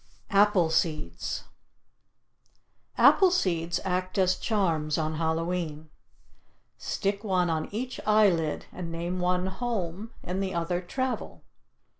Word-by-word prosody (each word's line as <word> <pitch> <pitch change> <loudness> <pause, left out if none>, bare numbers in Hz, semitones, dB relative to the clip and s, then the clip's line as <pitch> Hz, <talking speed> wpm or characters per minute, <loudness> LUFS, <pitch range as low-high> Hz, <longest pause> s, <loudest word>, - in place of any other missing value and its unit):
APPLE 200 -5 +4
SEEDS 160 -1 -1 1.5
Apple 380 -2 +7
seeds 175 - 0
act 185 0 -1
as 185 -1 +3
charms 165 -9 0
on 155 -1 -1
Hallowe'en. 160 -1 -2 0.9
Stick 200 +1 -2
one 180 -4 +1
on 155 -1 -2
each 245 +5 -4
eyelid 190 -8 +3
and 175 -2 -6
name 170 +2 -3
one 180 0 +1
"Home" 195 -1 -3
and 185 +2 -3
the 190 -2 -2
other 175 +1 -1
"Travel." 260 +8 -4
180 Hz, 110 wpm, -28 LUFS, 165-200 Hz, 1.5 s, Apple